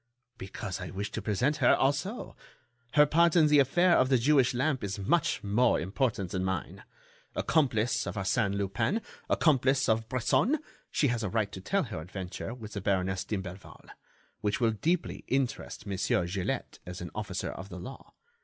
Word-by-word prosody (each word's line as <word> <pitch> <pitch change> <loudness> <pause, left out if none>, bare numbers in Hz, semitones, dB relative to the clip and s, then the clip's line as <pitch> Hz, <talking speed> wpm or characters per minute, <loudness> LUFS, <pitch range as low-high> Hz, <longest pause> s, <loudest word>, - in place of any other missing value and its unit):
"Because 95 -1 -6
I 90 - -5
wish 100 +4 -4
to - - -4
present 125 +9 0
her 130 -5 +5
also. 145 - -1 0.6
Her 150 0 +7
part 170 +3 +3
in 165 -3 +6
the 150 -1 +5
affair 170 +6 +4
of 130 - +3
the 130 - +5
Jewish 130 0 +3
lamp 130 -1 0
is 100 0 -3
much 135 - +1
more 105 +5 +3
important 100 - -1
than 95 -1 -1
mine. 95 -3 -3 0.5
Accomplice 125 -7 +1
of - - -4
Arsène 100 +1 0
Lupin, 100 - -1 0.3
accomplice 135 -3 +3
of 110 0 +1
Bresson, 130 - +2 0.3
she 145 - +2
has 120 -1 -1
a 105 - -2
right 110 -1 0
to 95 - -8
tell 195 - 0
her 110 - -6
adventure 90 +5 -6
with 115 -3 -9
the 100 - -4
Baroness 95 -1 0
d'Imblevalle—which 95 +2 -6
will 115 -2 +3
deeply 160 - -1
interest 130 -1 -2
Monsieur 95 -3 0
Gilett 90 +1 -3
as 90 0 -8
an 90 - -6
officer - - -4
of 95 +1 -8
the 90 - -8
law. 95 +10 -10
110 Hz, 170 wpm, -29 LUFS, 95-135 Hz, 0.6 s, Her